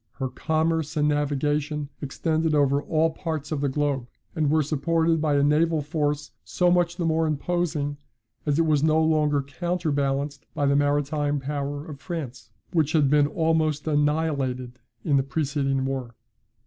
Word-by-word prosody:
Her 135 -2 -3
commerce 160 +2 -1
and 150 0 +3
navigation 145 0 0
extended 155 +2 0
over 140 -1 +3
all 160 +1 +1
parts 160 -3 -4
of 150 -3 -1
the 140 - +1
globe, 140 -3 -1 0.3
and 155 -3 +1
were 155 +1 +3
supported 160 +2 +1
by 150 -2 +2
a 140 - +3
naval 155 +1 +2
force 150 -1 -2
so 180 -1 +1
much 175 -1 +2
the 175 - -1
more 160 0 +2
imposing, 150 -1 -1 0.5
as 145 -1 0
it 165 - +3
was 150 -3 +2
no 155 +1 +3
longer 150 -3 +2
counter 170 +3 -2
balanced 140 0 -1
by 145 - 0
the 140 0 +3
maritime 145 0 +1
power 145 +1 -4
of 145 -3 -9
France, 140 -8 -6 0.2
which 155 -3 +2
had 145 -4 +3
been 145 -1 +4
almost 155 -1 0
annihilated 145 -5 0 0.3
in 145 -3 +3
the - - +4
preceding 135 -2 -1
war. 130 -3 -4
150 Hz, 160 wpm, -25 LUFS, 140-160 Hz, 0.5 s, been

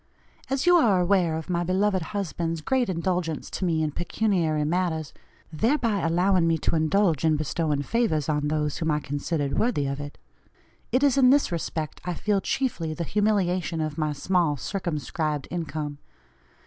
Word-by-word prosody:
As 270 +3 0
you 355 0 +7
are 210 - +4
aware 175 -3 +2
of 160 - -6
my 175 -1 0
beloved 190 +2 +1
husband's 165 -3 -3
great 255 +5 +1
indulgence 175 -2 -2
to - - -4
me 160 -3 +1
in 155 - -1
pecuniary 170 -3 0
matters, 160 -2 -1 0.4
thereby 230 - +1
allowing 175 +1 +2
me 165 0 +2
to 160 - 0
indulge 165 0 +2
in 160 -1 +3
bestowing 150 -1 -1
favors 160 - 0
on 150 -1 0
those 150 -1 -1
whom 160 - -1
I 150 -1 +2
considered 145 0 -2
worthy 220 -12 +1
of 140 0 -3
it, 145 0 -7 0.7
it 255 +3 +2
is 280 -1 +4
in 255 -2 +6
this 280 -4 +3
respect 160 -2 -4
I 180 -1 -3
feel 205 +1 0
chiefly 175 -14 -2
the 170 - -3
humiliation 185 -3 0
of 155 0 -3
my 155 -1 0
small 160 0 +1
circumscribed 155 - -3
income. 155 -4 -4
170 Hz, 165 wpm, -25 LUFS, 155-195 Hz, 0.7 s, you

